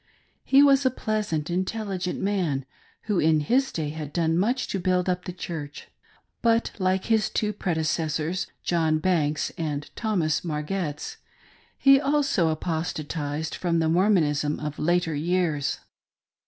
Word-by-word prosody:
He 275 +1 +6
was 280 -1 +5
a 260 - +4
pleasant, 210 -10 -2
intelligent 185 0 -2
man, 175 -9 0 0.4
who 210 -4 0
in 155 0 +3
his 260 - +2
day 155 -3 -2
had 150 -1 -6
done 165 0 +1
much 240 +9 +1
to 195 - -1
build 180 0 +1
up 180 0 -1
the - - -4
Church; 160 -5 -7 0.5
but 230 0 +2
like 185 0 +1
his 220 -3 +2
two 210 -1 -1
predecessors, 160 -1 -1 0.2
John 160 -2 +2
Banks 155 -3 0
and 150 -3 -3
Thomas 180 -9 0
Margetts, 150 -1 -3 0.6
he 275 0 +6
also 280 - +2
apostatised 155 -2 -3
from 170 -2 0
the 160 -1 +2
Mormonism 160 -5 +2
of 150 0 -5
later 175 0 +1
years. 160 -1 0
175 Hz, 135 wpm, -25 LUFS, 155-195 Hz, 0.6 s, He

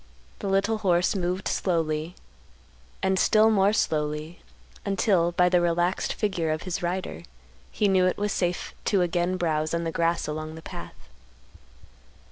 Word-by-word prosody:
The - - -4
little 205 +3 +1
horse 180 -2 +2
moved 180 0 -1
slowly, 165 -2 -1 0.9
and 190 0 +2
still 220 +1 +5
more 200 -1 +4
slowly, 155 -3 -1 0.4
until, 195 -4 +2
by 180 +1 +4
the 180 -1 +3
relaxed 175 +2 0
figure 180 -6 -1
of 155 +1 -2
his 185 - -3
rider, 175 - -3 0.5
he 210 - +1
knew 185 -2 +4
it 185 - 0
was 205 0 -1
safe 180 -2 -2
to 195 -4 +3
again 175 +1 0
browse 155 -2 0
on 170 - -1
the 165 - -2
grass 170 +1 0
along 155 +1 -5
the 160 - -11
path. - - -8
175 Hz, 150 wpm, -26 LUFS, 165-195 Hz, 0.9 s, still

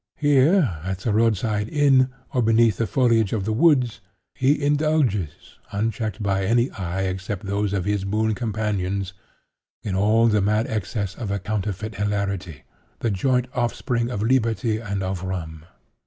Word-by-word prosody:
Here, 145 - +3
at 95 0 -4
the 110 - 0
road 110 -1 +3
side 105 +1 -2
inn, 135 -3 +4 0.2
or 125 - +2
beneath 115 -2 +3
the 115 - 0
foliage 115 -5 +2
of 105 -4 -1
the 110 - 0
woods, 130 -3 +3 0.3
he 135 +3 +2
indulges, 145 - 0
unchecked 110 0 -2
by 95 -1 0
any 120 +6 +2
eye 95 0 -3
except 95 +2 -4
those 100 0 -1
of 95 -3 -1
his 105 -1 0
boon 110 +3 0
companions, 100 -4 -2 0.7
in 100 - -3
all 105 +4 +3
the 105 -3 +3
mad 105 +3 +1
excess 105 -4 -3
of 105 0 -6
a 100 - 0
counterfeit 105 +1 -3
hilarity—the 100 - -4
joint 125 +6 +1
offspring 120 0 -1
of 105 -4 -3
liberty 115 -3 +1
and 100 -3 -3
of 95 -1 -3
rum. 80 -4 -5
105 Hz, 155 wpm, -23 LUFS, 95-120 Hz, 0.7 s, inn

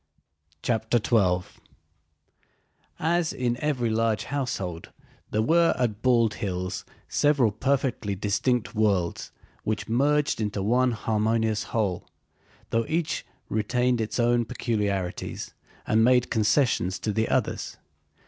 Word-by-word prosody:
CHAPTER 110 0 +1
XII 95 -6 +2 1.5
As 170 +1 +1
in 120 -1 -1
every 130 -6 0
large 110 -1 +1
household, 100 -12 -3 0.4
there 110 +1 +1
were 170 +6 +4
at 115 -4 -1
Bald 120 -4 +3
Hills 90 -4 -4 0.2
several 140 -7 +3
perfectly 125 -3 -1
distinct 105 +2 0
worlds 100 -6 0 0.3
which 110 0 -2
merged 140 +2 +2
into 105 -2 -2
one 125 +4 +2
harmonious 110 0 0
whole, 100 -6 -2 0.6
though 115 0 +1
each 160 0 -1 0.2
retained 120 +3 +1
its 110 +2 -3
own 120 0 +3
peculiarities 105 -6 -3 0.3
and 110 +1 +3
made 125 0 +3
concessions 105 -4 +2
to 105 - -2
the 110 +1 0
others. - - -1
115 Hz, 110 wpm, -26 LUFS, 105-125 Hz, 1.5 s, were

